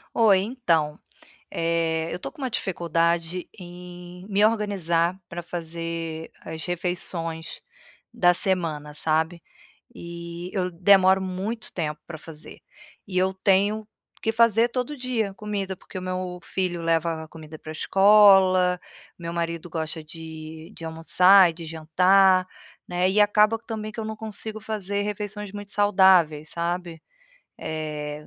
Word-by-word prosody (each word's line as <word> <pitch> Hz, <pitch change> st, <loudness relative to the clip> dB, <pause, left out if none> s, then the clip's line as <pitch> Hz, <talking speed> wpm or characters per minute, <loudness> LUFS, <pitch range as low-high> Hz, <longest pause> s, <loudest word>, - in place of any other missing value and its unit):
Oi, 205 Hz, -5 st, +5 dB
então, 170 Hz, -, 0 dB, 0.5 s
eh, 165 Hz, -1 st, 0 dB
eu -, -, -3 dB
tô -, -, -7 dB
com 325 Hz, -, -20 dB
uma 260 Hz, -, -1 dB
dificuldade 170 Hz, -3 st, -1 dB
em 180 Hz, 0 st, -11 dB
me 205 Hz, 0 st, +2 dB
organizar 190 Hz, -6 st, +1 dB
pra 175 Hz, 0 st, -6 dB
fazer 165 Hz, -1 st, -5 dB
as 160 Hz, 0 st, -6 dB
refeições 175 Hz, -2 st, -4 dB, 0.5 s
da 180 Hz, -7 st, +4 dB
semana, 165 Hz, -6 st, -1 dB
sabe, 160 Hz, +2 st, 0 dB, 0.5 s
e 170 Hz, -1 st, -8 dB
eu 185 Hz, -2 st, -1 dB
demoro 190 Hz, +2 st, +5 dB
muito 190 Hz, +5 st, -4 dB
tempo 150 Hz, -3 st, -4 dB
pra 160 Hz, -, -7 dB
fazer, 155 Hz, 0 st, -10 dB, 0.5 s
e 190 Hz, -, -8 dB
eu 190 Hz, +1 st, +1 dB
tenho 200 Hz, +3 st, +2 dB, 0.3 s
que 225 Hz, -, 0 dB
fazer 230 Hz, +1 st, +4 dB
todo 250 Hz, +4 st, -3 dB
dia 245 Hz, -5 st, -1 dB
comida, 200 Hz, -2 st, -4 dB
porque 185 Hz, -, -9 dB
o -, -, -9 dB
meu 185 Hz, -1 st, -4 dB
filho 180 Hz, -3 st, -2 dB
leva 165 Hz, -1 st, 0 dB
comida 155 Hz, -1 st, -11 dB
pra 155 Hz, -, -9 dB
escola, 190 Hz, 0 st, +5 dB, 0.4 s
meu 170 Hz, -1 st, -5 dB
marido 170 Hz, 0 st, -3 dB
gosta 160 Hz, 0 st, -4 dB
de 160 Hz, +1 st, -9 dB
de -, -, -11 dB
almoçar 180 Hz, +3 st, +5 dB
e -, -, -13 dB
de 165 Hz, 0 st, -9 dB
jantar, 185 Hz, +4 st, +4 dB, 0.4 s
né, 180 Hz, +1 st, +1 dB
e 200 Hz, +3 st, +3 dB
acaba 210 Hz, +2 st, +4 dB
que 230 Hz, -, -35 dB
também 215 Hz, -1 st, -5 dB
que 220 Hz, -, -8 dB
eu 220 Hz, -, -3 dB
não 220 Hz, 0 st, -4 dB
consigo 220 Hz, 0 st, -4 dB
fazer 205 Hz, -2 st, -3 dB
refeições 210 Hz, 0 st, -5 dB
muito 205 Hz, 0 st, -8 dB
saudáveis, 190 Hz, -7 st, +4 dB
sabe, 170 Hz, 0 st, -3 dB, 0.6 s
eh, 150 Hz, -1 st, -5 dB
180 Hz, 140 wpm, -25 LUFS, 165-200 Hz, 0.6 s, Oi